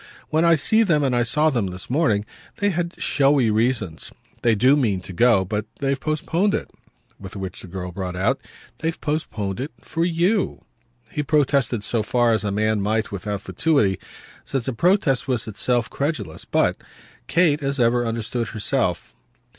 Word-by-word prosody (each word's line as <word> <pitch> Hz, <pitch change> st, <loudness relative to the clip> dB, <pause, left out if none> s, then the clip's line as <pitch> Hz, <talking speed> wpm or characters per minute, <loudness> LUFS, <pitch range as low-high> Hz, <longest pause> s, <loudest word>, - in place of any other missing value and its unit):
When 160 Hz, +1 st, +2 dB
I 170 Hz, -1 st, +6 dB
see 220 Hz, +9 st, +3 dB
them 165 Hz, -9 st, +3 dB
and 130 Hz, -3 st, +1 dB
I 120 Hz, -, +3 dB
saw 150 Hz, +7 st, +2 dB
them 115 Hz, -7 st, 0 dB
this 90 Hz, 0 st, -6 dB
morning 120 Hz, -8 st, +1 dB, 0.3 s
they 205 Hz, 0 st, +1 dB
have 170 Hz, -1 st, -2 dB
showy 135 Hz, -5 st, +3 dB
reasons. 110 Hz, -6 st, -1 dB, 0.3 s
They 115 Hz, -2 st, +3 dB
do 130 Hz, +7 st, +5 dB
mean 110 Hz, -10 st, +1 dB
to 95 Hz, -, -9 dB
go, 105 Hz, 0 st, +4 dB
but 105 Hz, +3 st, -3 dB
they've 135 Hz, 0 st, -1 dB
postponed 165 Hz, +7 st, 0 dB
it." -, -, -4 dB, 0.5 s
With 95 Hz, +1 st, -9 dB
which 95 Hz, -2 st, -5 dB
the -, -, -10 dB
girl 90 Hz, 0 st, -6 dB
brought 90 Hz, 0 st, -5 dB
out: 95 Hz, +2 st, 0 dB, 0.4 s
"They've 165 Hz, 0 st, -2 dB
postponed 110 Hz, -11 st, -3 dB
it 135 Hz, +4 st, -3 dB
for 165 Hz, -, -2 dB
YOU." 175 Hz, +4 st, +1 dB, 0.5 s
He 150 Hz, -, -1 dB
protested 140 Hz, -6 st, +1 dB
so 115 Hz, +1 st, 0 dB
far 120 Hz, +2 st, +2 dB
as 110 Hz, -3 st, +1 dB
a 105 Hz, -, -1 dB
man 110 Hz, +1 st, +1 dB
might 110 Hz, +2 st, 0 dB
without 100 Hz, 0 st, -4 dB
fatuity, 110 Hz, -, +1 dB, 0.4 s
since 135 Hz, -4 st, -3 dB
a 130 Hz, -, -1 dB
protest 165 Hz, -, +2 dB
was 125 Hz, -4 st, -1 dB
itself 115 Hz, +2 st, 0 dB
credulous; 150 Hz, +6 st, -3 dB
but -, -, +1 dB, 0.5 s
Kate, 160 Hz, -2 st, +3 dB
as 140 Hz, 0 st, -1 dB
ever, 120 Hz, 0 st, +3 dB
understood 115 Hz, 0 st, -2 dB
herself. 110 Hz, -2 st, -1 dB
120 Hz, 170 wpm, -22 LUFS, 105-150 Hz, 0.5 s, I